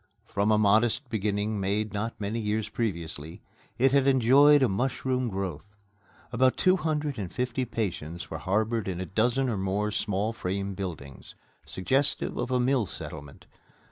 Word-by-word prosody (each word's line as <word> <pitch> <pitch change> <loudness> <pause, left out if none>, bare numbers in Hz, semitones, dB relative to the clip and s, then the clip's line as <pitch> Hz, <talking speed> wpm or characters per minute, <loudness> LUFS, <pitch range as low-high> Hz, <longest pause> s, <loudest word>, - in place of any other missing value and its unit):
From 105 0 0
a 105 - +4
modest 110 +6 +3
beginning 105 0 -1
made 105 +2 -1
not 105 +3 -3
many 105 +3 -2
years 105 0 -1
previously, 85 -9 -3 0.3
it 130 +2 +4
had 140 -1 +3
enjoyed 135 +3 +6
a - - +5
mushroom 125 +3 -1
growth. 95 0 -5 0.6
About 130 +2 +2
two 185 0 +4
hundred 150 - -2
and 95 -4 -4
fifty 125 +1 -2
patients 85 -8 -4
were 80 - -4
harbored 110 +4 0
in 90 -2 -3
a 95 - -3
dozen 120 +9 +1
or 115 -4 -1
more 100 +2 -1
small 105 0 -1
frame 100 -1 -3
buildings, 80 -9 -7 0.3
suggestive 135 +9 0
of - - -2
a 125 -1 +1
mill 125 -3 +2
settlement. 70 -4 -9
110 Hz, 155 wpm, -27 LUFS, 95-125 Hz, 0.6 s, enjoyed